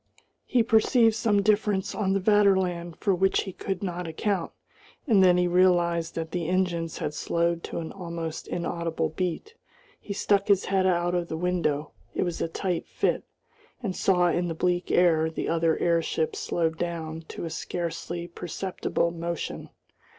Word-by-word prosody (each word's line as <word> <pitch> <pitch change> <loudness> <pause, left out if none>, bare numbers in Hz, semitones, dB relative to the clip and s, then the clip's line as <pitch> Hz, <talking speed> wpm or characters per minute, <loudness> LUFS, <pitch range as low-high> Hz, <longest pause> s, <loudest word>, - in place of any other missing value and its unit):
He 245 -2 +3
perceived 225 +1 +4
some 215 -3 +2
difference 205 -2 +1
on 195 -3 0
the 195 - +2
Vaterland 190 -4 +2
for 200 - +1
which 190 +1 +2
he 190 - -7
could 195 +1 -4
not 180 -2 -3
account, 175 +2 -1 0.5
and 215 -9 +5
then 180 -1 +6
he 180 - +3
realised 175 -2 +2
that 160 -1 -4
the 175 -2 -2
engines 175 -3 0
had 150 - -3
slowed 170 +2 0
to - - -6
an 165 -1 -4
almost 170 -3 -5
inaudible 170 -2 -2
beat. 180 - -3 0.5
He - - -9
stuck 200 0 +1
his 200 -2 +3
head 190 -1 +2
out 175 -1 +1
of 175 -1 0
the 160 - -4
window 165 -4 -1 0.2
it - - +1
was 175 -2 -3
a - - +1
tight 180 +1 -2
fit - - 0 0.6
and 190 -5 -2
saw 180 -2 +3
in 175 +1 0
the 165 - -3
bleak 175 +1 0
air 160 -3 +4
the 160 - -4
other 165 -1 +2
airships 165 -2 0
slowed 160 -1 -1
down 165 -2 -3
to - - -6
a 165 - -5
scarcely 170 0 -4
perceptible 175 0 -2
motion. 170 0 -4
175 Hz, 165 wpm, -27 LUFS, 165-190 Hz, 0.6 s, then